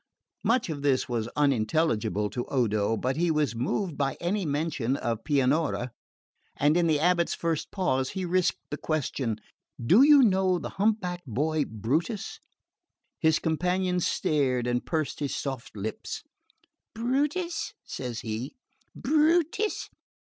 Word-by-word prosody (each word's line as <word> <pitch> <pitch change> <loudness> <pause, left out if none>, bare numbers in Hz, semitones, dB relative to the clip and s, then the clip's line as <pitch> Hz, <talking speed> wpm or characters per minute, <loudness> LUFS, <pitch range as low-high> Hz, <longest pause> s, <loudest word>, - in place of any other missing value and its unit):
Much 230 +2 +2
of 155 -4 -4
this 140 -2 +2
was 115 -2 -2
unintelligible 115 - +1
to 120 +3 -3
Odo; 110 -4 +1
but 130 +5 -1
he 175 +1 +2
was 150 -5 +1
moved 150 - -2
by 135 -1 0
any 180 +1 -1
mention 145 -4 -1
of 115 -4 -2
Pianura, 140 -2 +1 0.7
and 145 +2 +3
in 175 -1 +3
the 155 -2 +3
abate's 170 +2 +2
first 165 -2 -2
pause 135 -9 0
he 185 - -1
risked 180 +1 +1
the 145 - -2
question 135 -8 -2 0.4
"Do 175 - +5
you 285 -1 +8
know 190 -4 +3
the - - -5
hump 220 +1 +3
backed 180 -3 -5
boy 150 +5 0
Brutus?" 145 - -2 0.8
His 160 -1 +4
companion 180 +3 0
stared 135 -7 +1
and 120 0 0
pursed 155 -3 -2
his 145 -2 -2
soft 135 -5 -5
lips. 105 +2 -5 0.7
"Brutus?" 290 +9 -1
says 120 -3 -5
he. 115 - -5 0.4
"Brutus? 320 - +2
155 Hz, 135 wpm, -27 LUFS, 125-185 Hz, 0.8 s, you